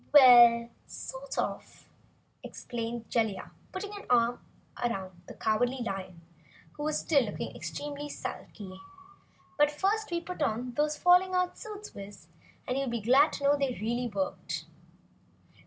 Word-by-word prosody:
"Well 240 -4 +8 0.2
sort - - -7
of," - - -4 0.5
explained 235 -1 -6
Jellia, 220 -5 -1 0.2
putting 400 +2 -5
an 410 - -9
arm 240 0 +3 0.4
around 190 -7 -3
the - - -9
Cowardly 245 +4 0
Lion, 185 -5 -5 0.5
who 300 +1 -3
still 285 -4 +2
was 205 - -4
looking - - -5
extremely 290 0 -5
sulky. 190 -8 -7 0.8
"But 295 0 +6
first 395 +8 0
we 345 -1 -1
put 360 +1 -7
on 240 +3 -1
those 300 +3 0
falling 365 +1 +5
out 365 0 +1
suits, 425 -1 -8
Wiz, 195 -5 -11 0.4
and 255 +2 0
you'll 275 - -1
be 235 0 -2
glad 265 +8 +5
to - - -5
know 285 +1 +5
they 275 -3 -1
really 240 +3 -1
worked." 200 -4 -3
250 Hz, 140 wpm, -30 LUFS, 225-305 Hz, 0.8 s, Well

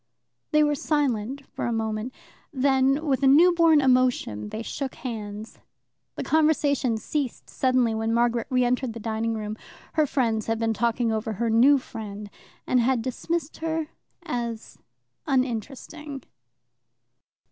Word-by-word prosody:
They 305 0 +4
were 295 0 +2
silent 275 -3 -1
for - - -5
a - - -1
moment. 220 +1 -2 0.4
Then, 270 +1 +2
with 270 -2 +1
a 275 - +4
newborn 330 +1 +6
emotion, 250 - +1
they 220 - -5
shook 270 +3 -4
hands. 215 -3 -7 0.6
The - - -4
conversation 290 -6 +2
ceased 270 +3 -4
suddenly 255 -3 +2
when 225 +1 -1
Margaret 235 0 +1
re 250 -1 +2
entered 250 -1 0
the 230 - -7
dining 225 +1 -2
room: 215 0 -5 0.4
her 310 -2 +2
friends 230 -6 0
had 225 0 0
been 225 0 0
talking 235 +1 0
over 220 0 -2
her 230 +3 -1
new 260 +6 +6
friend, 210 -5 -8 0.3
and 250 - +2
had 240 -1 +1
dismissed 320 +5 -3
her 320 -1 -2 0.3
as 235 -2 -5 0.5
uninteresting. 270 +3 -3
250 Hz, 135 wpm, -25 LUFS, 225-280 Hz, 0.6 s, newborn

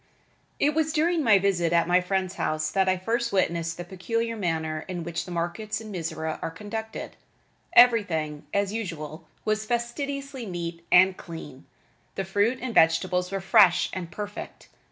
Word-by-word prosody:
It 295 +1 +3
was 315 0 +1
during 325 +1 +2
my 220 -5 +6
visit 185 -4 +1
at 170 -1 +3
my 180 +1 +4
friend's 185 0 -1
house 155 -4 -1
that 190 +1 +2
I 185 - +2
first 235 +5 -1
witnessed 170 -3 0
the 175 - -5
peculiar 230 +6 -2
manner 160 -5 -2
in 180 -2 -4
which 170 0 -4
the 180 - -9
markets 175 +6 -3
in 220 -1 -9
Mizora 160 -3 -4
are - - -2
conducted. 215 +6 -6 0.6
Everything, 175 -12 +4
as 200 0 0
usual, 165 -8 -5 0.2
was 215 0 0
fastidiously 270 +2 -3
neat 170 -2 -5
and 185 +1 +6
clean. 150 -6 -10 0.5
The 195 - -2
fruit 205 +6 +1
and 250 -3 -3
vegetables 180 +1 +3
were 195 0 -2
fresh 190 -2 +5
and 180 -3 -5
perfect. 205 +2 -7
190 Hz, 160 wpm, -26 LUFS, 170-220 Hz, 0.6 s, my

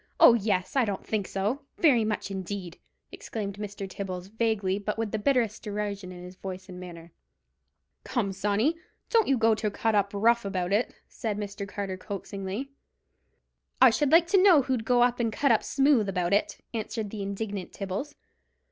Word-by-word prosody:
Oh, - - +9
yes! 200 -3 0
I 265 - +4
don't 200 -4 -3
think 210 -3 -1
so; 210 +9 -1 0.2
very 265 -9 +4
much 215 -2 -2
indeed," 190 -2 -5 0.3
exclaimed 205 -3 -5
Mr. 205 -1 -5
Tibbles, 185 -1 -6
vaguely, 210 -3 0
but 210 +1 -3
with 225 -2 -2
the 220 - -1
bitterest 230 -2 +1
derision 205 -3 -4
in 180 -1 -9
his 180 +1 -10
voice 185 0 -7
and 180 -1 -8
manner. 170 -2 -10 0.9
"Come, 230 -7 -1
Sawney, 210 - +1 0.3
don't 455 -2 +4
you 270 - +3
go 225 -1 +4
to 215 0 -1
cut 225 +2 0
up 200 -1 +2
rough 235 +3 +3
about 190 -2 -2
it," 220 +4 +2 0.2
said 215 -4 -4
Mr. 200 -1 -5
Carter, 200 -2 -4
coaxingly. 200 +5 -5 1.1
"I 260 -2 +8
should 285 +4 +1
like 330 +1 +7
to 385 0 +5
know 355 -8 +7
who'd 250 -4 -1
go 245 0 +4
and 240 -2 +1
cut 280 +4 +2
up 225 - +4
smooth 270 -7 +3
about 180 -1 0
it?" 205 - +1 0.2
answered 220 -2 -3
the 215 - -5
indignant 200 -1 -4
Tibbles. 200 +10 -5
210 Hz, 175 wpm, -28 LUFS, 195-235 Hz, 1.1 s, Oh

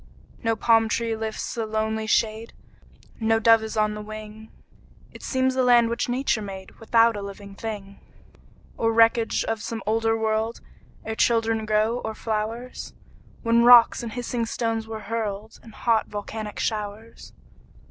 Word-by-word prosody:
No 225 0 +1
palm 225 0 +3
tree 230 +1 -1
lifts 220 0 -4
a 230 - 0
lonely 220 0 -2
shade, 220 +1 0 0.7
No 225 0 +2
dove 225 0 +5
is 220 0 -6
on 215 0 +2
the 210 - -6
wing; 215 +1 -9 0.6
It - - -13
seems 260 0 0
a 260 - +2
land 240 -2 +4
which 235 +1 -2
Nature 245 -2 0
made 190 -2 -8
Without 230 0 +3
a 205 - -5
living 200 0 -9
thing, 200 -2 -7 0.8
Or 225 0 +1
wreckage 230 0 +3
of 225 -1 -3
some 225 +1 -5
older 225 +1 +1
world, 220 +1 -1 0.5
Ere 220 - -3
children 225 -1 +1
grew, 215 +3 +1
or 220 -2 -5
flowers, 225 +3 -4 0.5
When 235 0 +3
rocks 240 -1 +7
and 230 -2 -6
hissing 240 -1 -3
stones 225 -1 -2
were 220 -1 -6
hurled 215 0 -4
In 230 - -13
hot, 225 0 +1
volcanic 210 +1 -6
showers. 215 +1 -4
225 Hz, 155 wpm, -24 LUFS, 215-230 Hz, 0.8 s, rocks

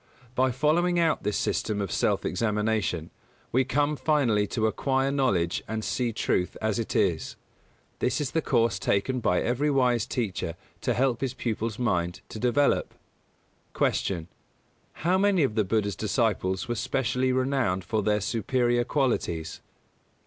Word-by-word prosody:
By 130 0 +2
following 155 +7 +2
out 165 -2 +2
this 105 - -1
system 105 -2 -1
of 100 -3 -2
self - - +1
examination, 105 -6 -1 0.4
we 130 +2 +3
come 145 +4 +1
finally 130 -10 +2
to 110 +1 -1
acquire 135 +4 +1
knowledge 100 -12 +1
and 110 0 -3
see 120 +1 -1
truth 90 -4 -1
as 110 0 0
it 115 - -3
is. - - +1 0.6
This 125 - 0
is 145 -3 -2
the 160 - +1
course 115 -9 +1
taken 125 +7 0
by 90 -6 +1
every 130 +5 +1
wise 125 -5 +2
teacher 90 -8 -2 0.3
to - - 0
help 125 -2 +1
his 130 -1 -2
pupil's 115 -3 -2
mind 90 -8 -1
to 110 - -7
develop. 125 +4 +1 0.8
249. 85 -5 0
Q. 85 - -28 0.7
_How 185 +3 +3
many 200 -5 +3
of 130 - +1
the 110 -1 +2
Buddha's 100 -1 0
disciples 105 -3 0
were 120 - -1
specially 130 +2 0
renowned 130 -8 0
for 105 +5 -1
their 105 +1 +1
superior 120 +3 +1
qualities? 115 - -1
120 Hz, 150 wpm, -27 LUFS, 105-135 Hz, 0.8 s, we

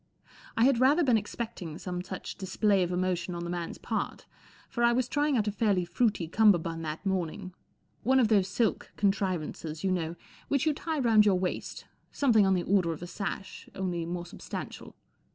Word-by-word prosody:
I 225 - +4
had 265 -3 +4
rather 285 +7 +5
been 250 -5 +4
expecting 210 -6 -4
some 180 -1 -4
such 185 0 -6
display 195 +1 +1
of 180 -1 0
emotion 180 0 -1
on 170 - -4
the 170 - -4
man's 175 -1 -4
part, - - -3 0.4
for 240 - -2
I 235 0 +5
was 250 0 +1
trying 290 -1 +1
out 215 -2 +1
a - - +1
fairly 200 -4 +1
fruity 200 -2 0
cummerbund 170 -4 +3
that 155 +4 -5
morning—one 190 +7 -2
of 240 - +4
those 200 -4 +3
silk 220 +3 -1
contrivances, 185 -6 -1
you 190 - +1
know, 170 -2 -1 0.3
which 280 +1 +1
you 310 - +3
tie 320 +2 -3
round 225 -5 +5
your 190 -2 +4
waist, 180 0 -3 0.3
something 225 -8 +4
on 190 - +4
the 175 - 0
order 180 -4 +2
of 160 - -9
a - - -6
sash, 195 0 -6
only 180 -3 -2
more 175 0 -4
substantial. 175 - -8
195 Hz, 185 wpm, -29 LUFS, 175-225 Hz, 0.4 s, rather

